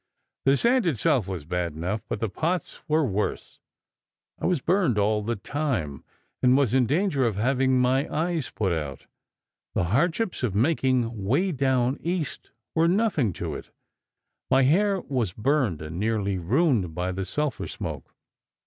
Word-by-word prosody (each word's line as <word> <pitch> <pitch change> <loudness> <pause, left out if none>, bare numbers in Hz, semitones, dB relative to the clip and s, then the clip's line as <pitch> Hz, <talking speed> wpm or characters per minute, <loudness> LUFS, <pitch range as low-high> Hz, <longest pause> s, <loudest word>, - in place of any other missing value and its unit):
The 135 +1 +5
sand 235 - +3
itself 120 - +1
was 90 -6 -5
bad 85 -1 -2
enough, 90 +7 -3
but - - -2
the 115 - 0
pots 170 - -2
were 155 0 +2
worse. 105 -3 -3 0.8
I - - -1
was 180 -4 +2
burned 170 - +2
all 105 +1 +2
the 115 +3 -2
time, 100 - -3 0.4
and 125 +1 +5
was 135 -5 +2
in 130 -2 +3
danger 150 - +1
of 110 - -1
having 130 +4 +2
my 130 +3 +2
eyes 165 -2 -1
put 95 -5 -1
out. 75 -4 -4 0.7
The - - +2
hardships 175 - +1
of 115 -7 -1
making 120 -4 +1
'Way 150 - +1
Down 130 -2 +1
East' 170 -3 -3 0.2
were 165 +1 +3
nothing 175 - +2
to - - -4
it. - - -8 0.8
My 135 +1 +5
hair 195 +7 +3
was 120 - -2
burned 115 - 0
and 80 +3 -6
nearly 100 -3 0
ruined 110 - +1
by 90 +1 -1
the 95 +1 -3
sulphur 150 +8 -2
smoke. - - -6
130 Hz, 160 wpm, -26 LUFS, 100-155 Hz, 0.8 s, The